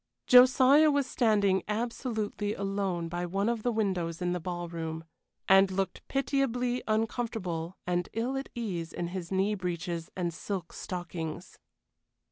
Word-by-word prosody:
Josiah 260 Hz, +4 st, +7 dB
was 285 Hz, -2 st, +2 dB
standing 205 Hz, -6 st, +2 dB
absolutely 215 Hz, -2 st, -2 dB
alone 195 Hz, -3 st, -2 dB
by 175 Hz, +1 st, -3 dB
one 195 Hz, +4 st, -1 dB
of 235 Hz, -1 st, 0 dB
the 245 Hz, -, +1 dB
windows 185 Hz, -7 st, -1 dB
in 180 Hz, -1 st, -1 dB
the 180 Hz, -, -1 dB
ballroom, 165 Hz, -2 st, -4 dB, 0.4 s
and 195 Hz, 0 st, +6 dB
looked 190 Hz, -1 st, -2 dB
pitiably 250 Hz, -3 st, 0 dB
uncomfortable 215 Hz, -6 st, -2 dB
and 180 Hz, 0 st, -1 dB
ill 235 Hz, +4 st, -1 dB
at 270 Hz, 0 st, -4 dB
ease 180 Hz, -9 st, -4 dB
in 170 Hz, -1 st, -3 dB
his 175 Hz, -1 st, -6 dB
knee 195 Hz, +2 st, +2 dB
breeches 175 Hz, -3 st, -3 dB
and 175 Hz, -2 st, -1 dB
silk 180 Hz, +1 st, -5 dB
stockings. 175 Hz, -1 st, -6 dB
195 Hz, 135 wpm, -29 LUFS, 175-230 Hz, 0.4 s, Josiah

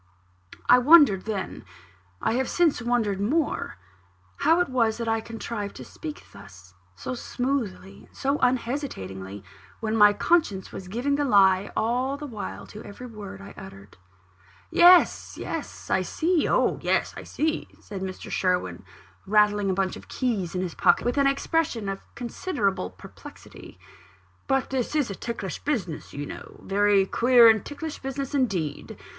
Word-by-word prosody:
I 250 Hz, -, +7 dB
wondered 275 Hz, -, +6 dB
then 210 Hz, -4 st, -4 dB, 0.6 s
I -, -, +1 dB
have 260 Hz, +2 st, 0 dB
since 335 Hz, -8 st, +2 dB
wondered 225 Hz, -5 st, 0 dB
more 285 Hz, -, -1 dB, 0.6 s
how 330 Hz, +2 st, +3 dB
it 355 Hz, -, +2 dB
was 230 Hz, -4 st, +1 dB
that 230 Hz, -1 st, -4 dB
I 225 Hz, 0 st, +1 dB
contrived 225 Hz, -2 st, -6 dB
to -, -, -9 dB
speak 310 Hz, -2 st, -8 dB
thus, 95 Hz, -3 st, -14 dB, 0.2 s
so 100 Hz, -, -5 dB
smoothly 245 Hz, -6 st, -3 dB
and -, -, -22 dB
so 275 Hz, +2 st, 0 dB
unhesitatingly, 165 Hz, -, -2 dB, 0.4 s
when 220 Hz, 0 st, -2 dB
my 210 Hz, -1 st, +7 dB
conscience 205 Hz, -, +1 dB
was 185 Hz, -, -8 dB
giving 250 Hz, +8 st, -1 dB
the 290 Hz, -, +1 dB
lie 195 Hz, -5 st, +4 dB
all 250 Hz, +5 st, 0 dB
the 295 Hz, -, -7 dB
while 225 Hz, -7 st, -7 dB
to 210 Hz, -, -11 dB
every 225 Hz, +5 st, -10 dB
word 205 Hz, -4 st, -9 dB
I 200 Hz, -, -11 dB
uttered. 105 Hz, -, -12 dB, 0.7 s
"Yes, 355 Hz, 0 st, +5 dB
yes; -, -, -6 dB
I -, -, +3 dB
see 335 Hz, -1 st, 0 dB
oh, -, -, +2 dB
yes, -, -, 0 dB
I -, -, -7 dB
see!" 315 Hz, +1 st, -2 dB
said 200 Hz, -3 st, -8 dB
Mr. 190 Hz, -1 st, -6 dB
Sherwin, 180 Hz, -, -1 dB, 0.4 s
rattling 205 Hz, -1 st, +3 dB
a -, -, +2 dB
bunch 190 Hz, -1 st, -1 dB
of -, -, -12 dB
keys 205 Hz, -9 st, -2 dB
in 180 Hz, -, 0 dB
his 180 Hz, -3 st, -3 dB
pocket, 180 Hz, +3 st, +3 dB
with 245 Hz, +4 st, +1 dB
an 280 Hz, -, +4 dB
expression 275 Hz, -5 st, 0 dB
of 195 Hz, 0 st, -3 dB, 0.2 s
considerable 235 Hz, -, -2 dB
perplexity; -, -, -13 dB, 0.7 s
"but 270 Hz, 0 st, 0 dB
this 265 Hz, +2 st, -2 dB
is 285 Hz, -8 st, +1 dB
a -, -, -5 dB
ticklish 200 Hz, -5 st, -5 dB
business, 195 Hz, -, -3 dB
you 145 Hz, +1 st, -5 dB
know -, -, -10 dB
a -, -, -19 dB
very 200 Hz, 0 st, +3 dB
queer 240 Hz, +3 st, +6 dB
and 220 Hz, -2 st, +5 dB
ticklish 300 Hz, +1 st, -6 dB
business 270 Hz, 0 st, -5 dB
indeed. 185 Hz, -, -2 dB
225 Hz, 160 wpm, -25 LUFS, 195-270 Hz, 0.7 s, I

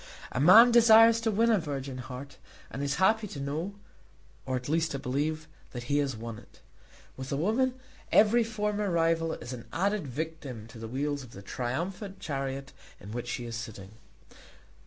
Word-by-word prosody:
A -, -, -2 dB
man 220 Hz, -, +8 dB
desires 230 Hz, -1 st, +7 dB
to 230 Hz, -, +1 dB
win 225 Hz, +2 st, +3 dB
a 215 Hz, -, +4 dB
virgin 135 Hz, -4 st, -5 dB
heart, 130 Hz, +3 st, -8 dB, 0.3 s
and 135 Hz, -, -5 dB
is 140 Hz, 0 st, -1 dB
happy 215 Hz, +4 st, +3 dB
to 150 Hz, -, -8 dB
know, 155 Hz, +8 st, -3 dB, 0.7 s
or 130 Hz, -, -1 dB
at 125 Hz, 0 st, -4 dB
least 160 Hz, +2 st, +1 dB
to -, -, -2 dB
believe, 150 Hz, +5 st, -2 dB, 0.3 s
that 120 Hz, -1 st, -5 dB
he 145 Hz, +4 st, +1 dB
has 135 Hz, -5 st, -1 dB
won 115 Hz, -1 st, -7 dB
it. -, -, -20 dB, 0.6 s
With 130 Hz, 0 st, -7 dB
a 140 Hz, -, 0 dB
woman 240 Hz, -, +1 dB, 0.4 s
every 225 Hz, +3 st, +5 dB
former 210 Hz, -2 st, -2 dB
rival 165 Hz, -1 st, +1 dB
is 120 Hz, +2 st, -7 dB
an 120 Hz, -2 st, -8 dB
added 200 Hz, -1 st, 0 dB
victim 140 Hz, -4 st, -5 dB
to 115 Hz, -, -11 dB
the 115 Hz, -, -6 dB
wheels 140 Hz, +4 st, -2 dB
of 125 Hz, -3 st, -12 dB
the 100 Hz, -, -10 dB
triumphant 175 Hz, -, -4 dB
chariot 135 Hz, -2 st, -4 dB, 0.3 s
in 100 Hz, -, -10 dB
which 120 Hz, +1 st, -5 dB
she 120 Hz, 0 st, -4 dB
is 115 Hz, -1 st, -5 dB
sitting. 110 Hz, -4 st, -7 dB
145 Hz, 180 wpm, -29 LUFS, 130-200 Hz, 0.7 s, man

